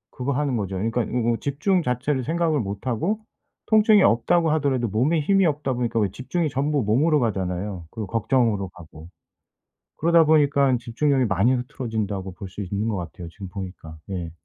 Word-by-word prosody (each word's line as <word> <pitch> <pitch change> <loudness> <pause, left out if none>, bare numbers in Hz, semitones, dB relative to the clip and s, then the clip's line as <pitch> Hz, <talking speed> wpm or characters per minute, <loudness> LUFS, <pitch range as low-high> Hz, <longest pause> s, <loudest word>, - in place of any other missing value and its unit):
그거 130 +2 -2
하는 140 -3 0
거죠. 95 -2 -3
그러니까 115 +5 0
으 - - -2
뭐 120 -1 0
집중 170 +6 0
자체를 125 +2 -1
생각을 165 0 0
못 100 +3 -5
하고 170 - 0 0.5
통증이 215 -2 +5
없다고 165 +8 +3
하더라도 135 -6 +1
몸에 130 - +1
힘이 195 +4 +3
없다 145 -4 0
보니까 120 -2 -1
왜 100 -2 +1
집중이 155 +5 -2
전부 140 0 0
몸으로 145 +9 +3
가잖아요. 95 -4 -2
그러고 110 -4 -5
걱정으로 115 -4 +1
가고. 80 -2 -13 0.9
그러다 165 0 +5
보니깐 140 -4 +3
집중력이 130 +2 +1
많이 105 +5 +2
흐트러진다고 110 -7 -3
볼 100 -2 -8
수 100 - -9
있는 100 +4 -2
것 105 - -1
같아요 85 0 -7
지금 95 0 -9
보니까. 90 -4 -8
예. 85 -3 -4
120 Hz, 400 characters per minute, -23 LUFS, 100-145 Hz, 0.9 s, 통증이